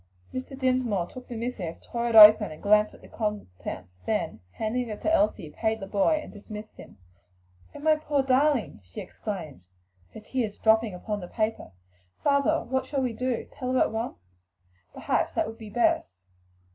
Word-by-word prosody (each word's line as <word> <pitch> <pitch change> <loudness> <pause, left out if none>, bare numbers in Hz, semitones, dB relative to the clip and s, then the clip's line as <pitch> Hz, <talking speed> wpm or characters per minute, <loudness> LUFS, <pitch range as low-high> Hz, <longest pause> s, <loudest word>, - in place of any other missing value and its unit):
Mr. 260 +1 -6
Dinsmore 255 -8 +1
took 250 +5 -11
the 240 - -7
missive, 225 -8 -4
tore 235 0 -3
it 230 - -1
open 215 -5 +10
and 155 - -11
glanced 210 +1 +4
at - - -18
the - - -14
contents, 90 - -5
then, - - -1
handing 235 +2 -2
it 210 - -5
to 320 - +2
Elsie, 295 - +1
paid 220 +6 -1
the 195 - -5
boy 205 +11 +2
and - - -11
dismissed 210 +1 -10
him. - - -13 0.8
"Oh, - - -7
my 310 0 +4
poor 295 -2 0
darling!" 265 - +2
she 90 -1 -10
exclaimed, 175 - -6 0.5
her - - -6
tears 215 -1 -3
dropping 220 -2 +3
upon 210 +3 -4
the 180 - -7
paper. 215 - -2 0.5
"Father, 285 +3 +2
what 260 +2 -2
shall 275 -2 -1
we 250 -2 -1
do? 250 +1 -2
tell 255 0 -4
her 260 - +3
at - - +3
once? 220 - -5 0.6
Perhaps - - -1
that - - +1
would 225 +1 -8
be 220 -2 -9
best." 240 - +1
225 Hz, 180 wpm, -27 LUFS, 205-255 Hz, 0.8 s, open